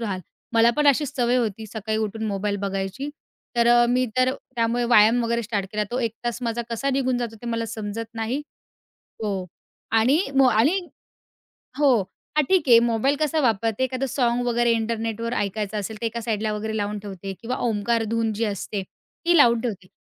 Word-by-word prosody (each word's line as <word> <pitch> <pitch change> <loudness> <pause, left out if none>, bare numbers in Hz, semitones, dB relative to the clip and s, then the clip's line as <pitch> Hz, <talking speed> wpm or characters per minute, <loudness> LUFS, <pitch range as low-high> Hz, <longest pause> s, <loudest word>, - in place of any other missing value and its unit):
राहाल. 200 -5 -3 0.3
मला 230 +1 +6
पण 295 -1 +2
अशीच 285 0 +3
सवय 245 0 +2
होती, 220 -2 -1
सकाळी 220 0 -3
उठून 220 +1 -3
मोबाईल 205 0 -1
बघायची. 195 +8 -3 0.5
तर 235 0 +4
अ, 240 0 +6
मी 250 +1 +2
तर 255 0 +3
त्यामुळे 240 -2 -2
व्यायाम 235 +1 +5
वगैरे 235 0 0
स्टार्ट 205 -3 -2
केला. 210 0 0
तो 245 - -1
1 230 -3 -1
तास 240 +1 -2
माझा 235 0 -1
कसा 255 +4 -1
निघून 260 -2 +1
जातो? 230 -2 -4
ते - - -7
मला 230 -1 -1
समजत 225 +1 -5
नाही. 230 +6 -2 0.8
हो 195 -3 -2 0.5
आणि 265 +8 +4 0.2
मग 265 -2 +6
आणि 250 - +3 1.0
हो. 285 -3 +5 0.4
हां, 300 - +4
ठीक 365 -7 +3
आहे 235 -2 +9
मोबाईल 235 +4 +1
कसा 310 +1 +1
वापरते? 225 -1 +1
एखादं 260 +1 -2
साँग 245 -2 +1
वगैरे 240 0 +2
इंटरनेटवर 230 0 -2
ऐकायचं 205 +1 -2
असेल, 210 +2 -4
ते 235 - -1
एका 230 +1 -3
साइडला 220 -2 -1
वगैरे 220 +1 -3
लावून 210 0 -2
ठेवते. 195 -1 -7
किंवा 245 +2 -3
ओमकार 225 +1 0
धून 230 -1 0
जी 220 +2 -1
असते, 205 -1 -3
ती 340 - -2
लावून 235 -5 +5
ठेवते. 195 -6 -4
230 Hz, 185 wpm, -24 LUFS, 215-245 Hz, 1.0 s, आहे